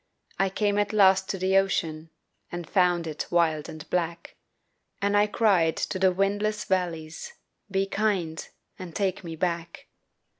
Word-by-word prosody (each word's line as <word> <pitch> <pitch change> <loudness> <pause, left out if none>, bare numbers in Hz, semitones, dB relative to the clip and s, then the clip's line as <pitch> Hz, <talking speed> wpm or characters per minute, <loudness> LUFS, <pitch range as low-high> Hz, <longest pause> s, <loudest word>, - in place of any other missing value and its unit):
I 195 0 +3
came 205 +1 0
at 205 +1 0
last 190 -2 +5
to 195 - -1
the 190 +1 +2
ocean 165 -5 0 0.4
And 175 -2 -5
found 180 -3 +2
it 155 -2 -4
wild 160 -3 +1
and 155 -1 -9
black, 170 -1 -2 0.6
And 200 +1 +1
I 205 0 +4
cried 195 -7 +2
to 185 - -2
the 190 0 +4
windless 205 +3 0
valleys, 175 - -2 0.4
"Be 195 0 +1
kind 195 -6 -1 0.3
and 180 -3 -8
take 190 -2 -1
me 165 -2 -6
back!" 170 0 -3
185 Hz, 150 wpm, -26 LUFS, 170-200 Hz, 0.6 s, last